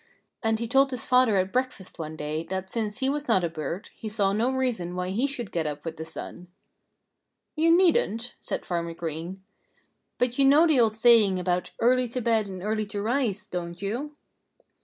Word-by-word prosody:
And 225 -1 +1
he 230 +1 -3
told 270 +3 +4
his 255 -3 -4
father 250 -5 +4
at 185 0 0
breakfast 255 -9 -2
one 155 -1 -5
day 155 +1 -3
that 190 +1 -5
since 220 +1 -3
he 265 - +2
was 290 +1 -1
not 190 -6 +3
a 170 - 0
bird, 165 +4 -5
he 220 - -7
saw 200 -2 +1
no 230 +5 +1
reason 240 -10 -1
why 180 0 -2
he 230 +9 +1
should 245 -7 -4
get 165 -2 -1
up 150 +1 -6
with 165 -1 -5
the 160 - -6
sun. 170 +2 -9 1.1
"You 320 +2 +3
needn't," 320 - +3
said - - -4
Farmer 170 -1 -3
Green. 170 +4 -6 0.7
"But 250 +1 0
you 275 - +6
know 290 +5 +6
the 310 -6 +3
old 220 -2 +3
saying 220 -4 +5
about 180 0 -1
'early 250 +1 +3
to 245 +2 -4
bed 225 -3 +1
and 185 -2 -7
early 215 0 -1
to 205 0 -4
rise,' 215 -2 -1
don't 175 -3 -5
you?" 245 +10 -4
215 Hz, 200 wpm, -26 LUFS, 180-250 Hz, 1.1 s, you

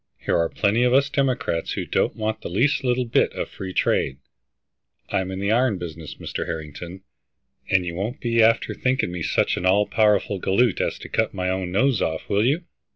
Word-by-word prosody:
Here - - -1
are 85 0 +2
plenty 105 +3 +1
of 125 +1 +4
us 140 +1 +3
Democrats 130 -11 0
who - - -3
don't - - 0
want 110 0 -3
the - - -6
least 130 - +1
little 125 0 +1
bit 115 - +2
of - - -4
free 95 -1 -7
trade. 65 -6 +1 0.9
I'm 95 -1 -1
in 95 - -4
the 100 +2 0
iron 120 -2 +2
business, 80 -3 -7
Mr. - - -5
Harrington, 85 +3 -7 0.7
and 95 -2 +3
you 85 - -4
won't 100 +8 -4
be 115 -1 +2
after 115 +1 +3
thinking 130 -8 0
me 90 -1 -5
such - - +1
an 90 - -3
all 100 +3 +4
powerful 105 -2 +2
galoot 100 +4 +2
as - - -1
to - - -9
cut - - -1
my 90 0 -1
own 95 -1 -2
nose 125 +3 +2
off, 80 0 -2
will 100 0 +2
you?" 155 +6 +1
100 Hz, 205 wpm, -23 LUFS, 90-120 Hz, 0.9 s, of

